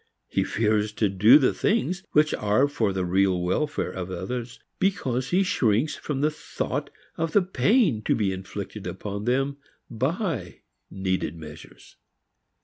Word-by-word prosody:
He - - 0
fears 105 -1 0
to 105 -1 +1
do 105 +8 +7
the 135 -4 +2
things 190 -4 0
which 150 0 +4
are 105 +7 +2
for 115 -8 0
the 95 -1 -1
real 95 0 +2
welfare 95 +7 -1
of 95 -1 -5
others 115 +7 -5 0.2
because 135 -10 0
he 185 +2 +3
shrinks 125 - +1
from 140 -3 -4
the 150 +1 +2
thought 150 - -4 0.3
of 165 -1 -2
the 205 - +5
pain 185 - +2
to - - +2
be 100 -4 0
inflicted 95 0 -7
upon 100 0 -5
them 135 +3 0 0.3
by 130 - -2 0.3
needed 95 -4 -2
measures. 80 -1 -12
115 Hz, 145 wpm, -25 LUFS, 95-150 Hz, 0.3 s, do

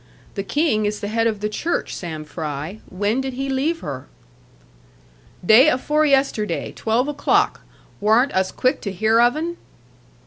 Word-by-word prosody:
The 200 - -3
King 215 -1 +1
is 210 0 -3
the 205 - -4
head 225 +1 +1
of 215 -3 -2
the 210 - 0
Church, 320 +11 -2
Sam 160 -4 -6
Fry; 155 +4 -5
when 205 +7 -1
did 265 -1 -4
he 270 +2 -3
leave 295 +6 -1
her?' 135 -2 -6 1.4
'Day 240 - +7
afore 300 +3 +1
yesterday. 270 -6 0
Twelve 230 +4 0
o'clock. 295 -1 +1 0.4
Warn't 225 +6 +3
us 190 0 +1
quick 255 - 0
to 200 - -4
hear 220 +4 +3
of 240 +2 +4
'un?' 340 +2 -3
225 Hz, 160 wpm, -21 LUFS, 205-270 Hz, 1.4 s, Day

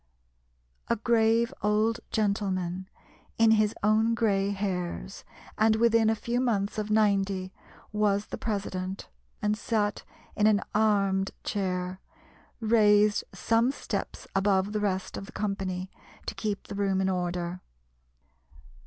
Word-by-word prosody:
A 235 - +2
grave 230 0 +2
old 215 +2 +2
gentleman, 190 -3 -1 0.5
"in 225 -1 +5
his 215 -1 +3
own 220 +2 +3
grey 200 -4 +1
hairs," 190 -1 -3 0.4
and 220 0 +5
within 225 -1 +4
a 225 - +2
few 235 +3 -2
months 215 -5 0
of 210 0 -3
ninety, 195 -3 +1 0.4
was 210 -1 +1
the - - -6
president, 195 -3 -3 0.3
and 210 0 +2
sat 210 -2 -1 0.3
in 210 - +3
an 210 -2 +3
"armed" 200 -3 +2
chair, 185 -2 -2 0.6
raised 210 -2 +4
some 230 +2 +2
steps - - -5
above 195 0 +2
the 210 - -1
rest 190 -2 -2
of 195 - -7
the - - -11
company, 190 -3 -3 0.3
to - - -3
keep 205 0 -3
the - - -7
room 200 -1 0
in 190 - +1
order. 180 -1 -2
205 Hz, 125 wpm, -28 LUFS, 190-220 Hz, 0.6 s, in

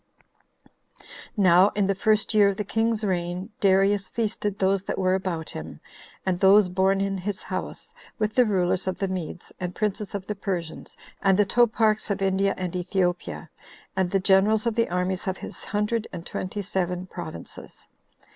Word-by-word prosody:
2. - - -22 0.4
Now, 185 +2 +6
in 205 -1 +2
the 195 - +2
first 215 +3 +1
year 205 -2 +6
of 200 - -3
the 210 - -1
king's 225 +1 0
reign, 180 -1 -2
Darius 195 0 +3
feasted 210 -3 -2
those 195 0 +2
that - - -3
were 185 -1 +2
about 185 -4 -2
him, - - -8 0.5
and 185 -2 0
those 195 0 +6
born 190 +2 +2
in 195 -1 -1
his 200 +2 -4
house, - - -6 0.2
with 215 0 -1
the 250 - +5
rulers 185 -2 +1
of 185 - -1
the 195 - -1
Medes, 180 -2 -5
and 180 -1 -4
princes 210 -1 -2
of 195 -2 -4
the 210 - -3
Persians, 185 -5 -5 0.2
and 195 -1 +4
the 205 - +4
toparchs 220 0 +2
of 200 -1 -1
India 195 0 +1
and 185 -1 -4
Ethiopia, 180 -1 -2 0.4
and 190 -2 +1
the 195 - +2
generals 200 +4 +3
of 235 - +1
the 230 +1 +1
armies 180 +1 -1
of 190 0 -1
his - - -9
hundred 210 +2 -1
and 170 - -7
twenty 200 +2 -4
seven 180 -1 -2
provinces. - - -9
195 Hz, 175 wpm, -25 LUFS, 185-210 Hz, 0.5 s, Now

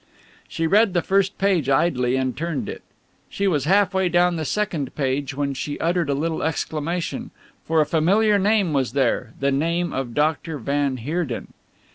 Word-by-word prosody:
She 165 - -2
read 200 +2 +3
the 175 - +2
first 195 0 +1
page 185 -8 +1
idly 135 -4 +2
and 130 -1 -1
turned 165 -2 -3
it. - - -6 0.5
She 200 - -1
was 150 -7 +1
half 195 +2 +3
way 190 -1 +1
down 175 0 +3
the 160 -1 -3
second 165 -8 -2
page 135 0 -1
when 140 0 -1
she 145 +2 -5
uttered 170 -2 0
a 140 - +1
little 160 +3 -2
exclamation, 160 +1 -3 0.4
for 160 -1 +2
a - - +3
familiar 200 +7 +3
name 200 -4 +2
was 130 -4 0
there, 125 -3 0
the 140 0 +1
name 170 +5 0
of 130 -3 -4
Dr. 155 +1 0
van 140 +1 -1
Heerden. 145 +1 -3
160 Hz, 175 wpm, -22 LUFS, 140-180 Hz, 0.5 s, read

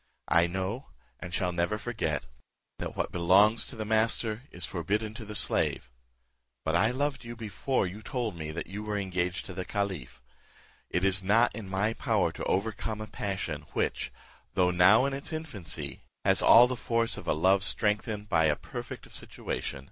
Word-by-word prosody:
I 85 +1 +5
know, 95 +8 -3 0.3
and 90 +1 -7
shall 90 0 0
never 85 +5 0
forget, 105 - -2 0.5
'that - - -5
what - - -1
belongs 95 +6 +4
to - - -7
the 110 -1 -4
master 110 0 +1
is 90 -1 -4
forbidden 105 +5 -2
to 110 0 -8
the 105 0 -7
slave;' 65 -9 +1 0.7
but 80 +1 +1
I 110 +6 +4
loved 135 +2 -1
you 120 0 -7
before 115 +3 -1
you 95 +4 -6
told 115 -3 -3
me 80 -2 -5
that 80 +2 -4
you 100 +3 -6
were 105 -1 -2
engaged 90 -2 -1
to 95 - -7
the 95 +1 -4
caliph; 95 -10 -3 0.7
it 90 - 0
is 95 0 +3
not 110 +5 +4
in 105 -4 -7
my 100 +4 +1
power - - +1
to - - -7
overcome 110 +2 -1
a 110 - -4
passion 95 -8 -4
which, - - -1 0.4
though 90 -1 +4
now 95 +8 +6
in 140 - -1
its 140 +4 -2
infancy, 95 - -4 0.2
has - - +5
all 120 +2 +9
the 130 +1 -2
force 115 -1 +1
of - - -8
a - - +3
love 95 +5 +3
strengthened 105 0 +1
by 80 -5 +3
a 75 -1 +3
perfect - - -7
of - - -16
situation. 70 - -4
100 Hz, 185 wpm, -29 LUFS, 90-110 Hz, 0.7 s, all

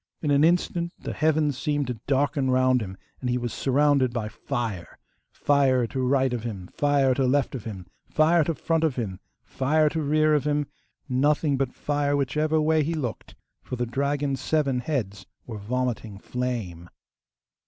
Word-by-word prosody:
In 150 - +1
an 140 +1 +4
instant 170 0 +1
the - - -6
heavens 155 -3 +1
seemed 145 -2 0
to 125 -3 -5
darken 140 0 +1
round 130 -1 +3
him 95 -2 -6 0.2
and 125 - -3
he 125 - +1
was 120 -2 -3
surrounded 140 -1 +2
by 115 -3 -3
fire 110 -6 -4 0.3
fire 135 -4 +2
to 130 +3 -3
right 130 0 +2
of 120 - -2
him, 100 -6 -6
fire 140 -2 +3
to 130 0 +1
left 140 0 +1
of 125 -6 -6
him, 95 -5 -7 0.2
fire 160 +2 +4
to 165 - -1
front 165 +1 0
of 155 -5 +1
him, 100 -7 -4 0.2
fire 150 +3 +1
to 160 +1 -2
rear 155 +1 +3
of 150 -1 +1
him; 145 0 +1 0.4
nothing 145 +2 +2
but 135 -2 -2
fire 145 -1 0
whichever 155 +3 +1
way 155 0 +3
he 160 +3 -1
looked, 125 -8 -5 0.3
for - - -6
the 120 0 -1
dragon's 140 +2 -1
seven 140 -4 +1
heads 110 -8 -3 0.2
were 110 -3 -7
vomiting 115 -1 -3
flame. 105 -8 -4
135 Hz, 175 wpm, -25 LUFS, 120-150 Hz, 0.4 s, an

